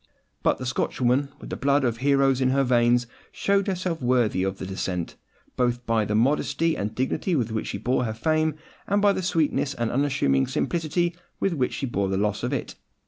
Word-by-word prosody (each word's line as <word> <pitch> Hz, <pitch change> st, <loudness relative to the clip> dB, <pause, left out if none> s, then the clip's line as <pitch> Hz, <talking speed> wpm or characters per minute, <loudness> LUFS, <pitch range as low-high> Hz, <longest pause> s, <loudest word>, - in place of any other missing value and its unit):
But -, -, +2 dB
the 130 Hz, -, -6 dB
Scotch 130 Hz, -, -2 dB
woman, 130 Hz, +3 st, +2 dB
with -, -, -10 dB
the -, -, -2 dB
blood 140 Hz, +1 st, +2 dB
of 120 Hz, -2 st, 0 dB
heroes 135 Hz, 0 st, +2 dB
in 130 Hz, -, +3 dB
her 135 Hz, +1 st, +2 dB
veins, 120 Hz, -1 st, +3 dB, 0.3 s
showed 200 Hz, 0 st, +1 dB
herself 180 Hz, -4 st, -2 dB
worthy 120 Hz, -6 st, +2 dB
of 95 Hz, 0 st, -1 dB
her 95 Hz, -, -6 dB
descent, 95 Hz, -2 st, -3 dB, 0.4 s
both 120 Hz, -1 st, 0 dB
by 115 Hz, -2 st, +1 dB
the 105 Hz, -, -1 dB
modesty 150 Hz, +7 st, +2 dB
and 105 Hz, +2 st, -3 dB
dignity 135 Hz, -, 0 dB
with 120 Hz, -6 st, 0 dB
which 110 Hz, -, -2 dB
she -, -, -3 dB
bore 125 Hz, +4 st, 0 dB
her 110 Hz, -, -2 dB
fame, 155 Hz, +4 st, +1 dB, 0.3 s
and 200 Hz, +1 st, +2 dB
by 205 Hz, -1 st, +4 dB
the -, -, -2 dB
sweetness 155 Hz, -5 st, 0 dB
and 120 Hz, -2 st, -1 dB
unassuming 130 Hz, -, +1 dB
simplicity 170 Hz, +4 st, -1 dB, 0.2 s
with 195 Hz, -, +1 dB
which 130 Hz, -6 st, 0 dB
she -, -, -3 dB
bore 100 Hz, -6 st, -1 dB
the 95 Hz, -, 0 dB
loss 105 Hz, +1 st, 0 dB
of -, -, -2 dB
it. -, -, -3 dB
130 Hz, 205 wpm, -25 LUFS, 115-155 Hz, 0.4 s, by